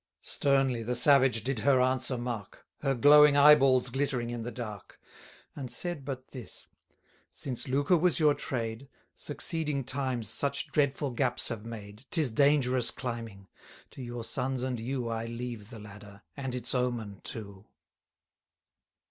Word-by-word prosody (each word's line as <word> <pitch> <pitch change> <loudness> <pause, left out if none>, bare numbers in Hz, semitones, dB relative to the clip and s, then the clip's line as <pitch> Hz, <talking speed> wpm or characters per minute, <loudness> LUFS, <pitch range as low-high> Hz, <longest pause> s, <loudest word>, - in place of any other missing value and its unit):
Sternly 135 -4 +2
the 120 +2 -2
savage 130 -3 +4
did 130 -1 -2
her 135 +2 +3
answer 130 0 +1
mark, 120 -4 -6
Her 135 0 0
glowing 145 +3 +7
eye 150 +1 +9
balls 130 -3 +3
glittering 135 -3 -1
in 120 -1 -4
the 115 - -4
dark, 110 -4 -8 0.6
And 135 -3 -6
said 165 +4 -3
but 130 -1 -6
this: 125 -4 -10 0.6
Since 130 +1 -5
lucre 145 +7 +2
was 175 +1 +2
your 150 -2 +5
trade, 120 0 -4 0.3
Succeeding 150 -2 -3
times 130 -3 -2
such 140 +5 0
dreadful 140 -1 0
gaps 120 0 0
have 115 -1 -6
made, 110 +2 -10
'Tis 155 -8 +1
dangerous 130 -2 +3
climbing: 115 -6 -6 0.4
to - - -10
your 120 -1 -6
sons 130 +1 -2
and 130 -2 -2
you 125 +1 -3
I 115 0 -3
leave 115 -3 -6
the 115 - -9
ladder, 105 -1 -12
and 130 -3 -4
its 125 -1 +1
omen 120 -6 -2
too. 100 -3 -7
125 Hz, 150 wpm, -29 LUFS, 115-140 Hz, 0.6 s, eye